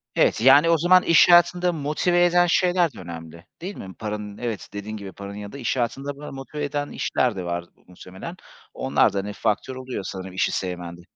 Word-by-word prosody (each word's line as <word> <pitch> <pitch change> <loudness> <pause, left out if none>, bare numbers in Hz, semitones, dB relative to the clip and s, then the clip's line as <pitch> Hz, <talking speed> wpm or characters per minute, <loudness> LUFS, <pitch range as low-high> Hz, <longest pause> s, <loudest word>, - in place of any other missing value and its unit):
Evet. - - +3
Yani, 140 +6 +7
o 165 - +5
zaman 180 +3 +5
iş 170 +1 +6
hayatında 175 +1 +5
motive 165 +4 +1
eden 175 0 +4
şeyler 175 -3 +2
de - - -12
önemli, 85 0 -9 0.2
değil 195 +4 -5
mi? 95 -1 -9
Paranın 105 -1 -5
Evet, 115 -4 -5
dediğin 105 +1 -6
gibi 100 -2 -8
paranın 100 +1 -9
ya 105 0 -7
da - - -9
iş 130 0 -2
hayatında 135 +4 -2
böyle 150 - -8
motive 135 +2 -6
eden 145 0 -2
işler 125 -5 0
de 95 - -4
var 85 0 -2 0.2
muhtemelen. 95 - -10 0.4
Onlar 130 -5 +2
da, - - -3
hani, 100 +1 -5
faktör 110 +5 -1
oluyor 130 -5 -5
sanırım 95 -1 -7
işi 95 - +1
sevmende. 90 -2 -4
125 Hz, 200 wpm, -24 LUFS, 100-160 Hz, 0.4 s, Yani